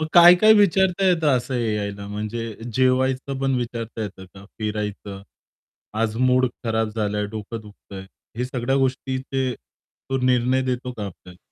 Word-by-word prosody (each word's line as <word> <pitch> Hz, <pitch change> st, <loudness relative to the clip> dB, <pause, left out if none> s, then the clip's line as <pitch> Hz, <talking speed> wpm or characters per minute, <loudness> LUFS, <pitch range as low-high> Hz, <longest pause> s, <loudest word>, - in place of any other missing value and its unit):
मग 155 Hz, -, -1 dB
काय-काय 175 Hz, +5 st, +8 dB
विचारता 195 Hz, -2 st, +3 dB
येतं 160 Hz, -7 st, +3 dB
असं 125 Hz, +2 st, -3 dB
एआयला 105 Hz, -4 st, -2 dB
म्हणजे 110 Hz, +2 st, -4 dB, 0.2 s
जेवायचं 130 Hz, +2 st, +1 dB
पण 135 Hz, -1 st, +1 dB
विचारता 115 Hz, -2 st, -4 dB
येतं 100 Hz, -2 st, -7 dB
का? 95 Hz, 0 st, -12 dB
फिरायचं, 105 Hz, -2 st, -4 dB, 0.7 s
आज 110 Hz, 0 st, -1 dB
मूड 130 Hz, +1 st, +3 dB, 0.2 s
खराब 110 Hz, -1 st, 0 dB
झालंय, 105 Hz, -1 st, -1 dB
डोकं 110 Hz, +1 st, -6 dB
दुखतंय, 100 Hz, -2 st, -11 dB, 0.3 s
हे 125 Hz, -, -1 dB
सगळ्या 125 Hz, +1 st, -1 dB
गोष्टीचे 130 Hz, 0 st, -1 dB
तो 135 Hz, +2 st, -8 dB
निर्णय 125 Hz, +1 st, +2 dB
देतो 125 Hz, 0 st, -2 dB
का 105 Hz, -2 st, -4 dB
आपल्याला? 90 Hz, -1 st, -12 dB
120 Hz, 140 wpm, -23 LUFS, 105-130 Hz, 0.7 s, काय-काय